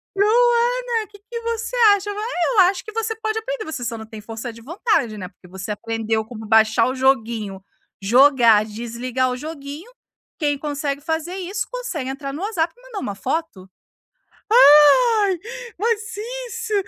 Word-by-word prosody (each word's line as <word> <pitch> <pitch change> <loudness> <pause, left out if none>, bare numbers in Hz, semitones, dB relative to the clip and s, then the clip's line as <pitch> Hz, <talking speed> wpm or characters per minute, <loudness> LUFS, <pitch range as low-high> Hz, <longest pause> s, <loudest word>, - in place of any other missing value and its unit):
Luana, 475 +2 +2
que 410 -1 -16
que 465 -1 -5
você 460 +1 -3 0.2
acha?" 405 +1 -5
"Eu 415 0 -1
acho 370 +1 +2
você 450 0 -2
pode 435 0 -3
aprender, - - -5
você 310 -6 -5
só 230 0 -3
não 220 - -8
tem 220 -1 -10
força 225 +2 -7
de 230 - -14
vontade, 285 - -1
né, 185 -2 -6
porque 180 -1 -20
você 190 +3 -6
aprendeu 225 +1 -2
como 220 -1 -9
baixar 220 +1 +4
o 260 - -2
joguinho, 225 -7 0 0.4
jogar, 235 -1 +5
desligar 240 +4 -3
o 250 - -3
joguinho, 300 - -8 0.5
quem 290 -3 0
consegue 285 -1 -3
fazer 320 +4 -3
isso 390 +3 -4
consegue 390 - -4
entrar 275 0 -5
no 315 - -6
WhatsApp 350 -6 -1
e - - -21
mandar 445 - -5
um - - -13
foto", 255 - -4 0.8
"Ah, 420 +4 +7 0.5
mas 455 +1 -1 0.3
isso, 460 -1 -5
300 Hz, 155 wpm, -21 LUFS, -, 0.8 s, Ah